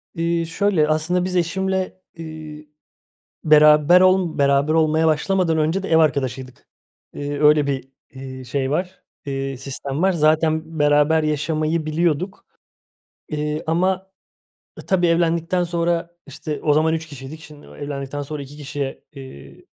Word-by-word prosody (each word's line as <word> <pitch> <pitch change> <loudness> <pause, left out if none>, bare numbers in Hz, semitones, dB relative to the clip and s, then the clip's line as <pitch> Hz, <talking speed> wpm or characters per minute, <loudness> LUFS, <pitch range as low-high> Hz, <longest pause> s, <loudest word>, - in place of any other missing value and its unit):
Eee, 170 0 0
şöyle, 165 -1 +1
aslında 160 +4 0
biz 185 0 -3
eşimle, 190 +2 -1
eee, 155 -2 -9 0.8
beraber 150 +3 +6
ol 185 -3 +3
beraber 140 +2 +2
olmaya 160 0 +2
başlamadan 165 +2 +1
önce 160 +5 0
de - - -5
ev 160 - +4
arkadaşıydık. 130 -5 -1 0.5
Eee, 145 0 -4
öyle 150 -1 +5
bir, 135 -1 -3 0.2
eee, 130 -1 -9
şey 130 +2 -2
var, 180 +4 -3 0.2
eee, 135 -1 -4
sistem 135 +3 -5
var. 190 - +3
Zaten 160 0 +1
beraber 150 +2 +3
yaşamayı 155 +1 -1
biliyorduk, 170 +3 -1 0.8
eee, 150 +1 -3
ama, 185 +3 0 0.7
ı - - -11
tabii 180 -2 +2
evlendikten 170 +1 +1
sonra 170 0 -1 0.2
işte 150 +1 -6
o 150 - +2
zaman 160 +2 +2
3 165 0 -4
kişiydik. 145 +2 -10
Şimdi, 150 -1 -14
o - - -14
evlendikten 145 0 -5
sonra 145 +1 -6
2 140 +2 -11
kişiye, 140 -1 -5
eee, 130 - -12
155 Hz, 140 wpm, -21 LUFS, 145-170 Hz, 0.8 s, beraber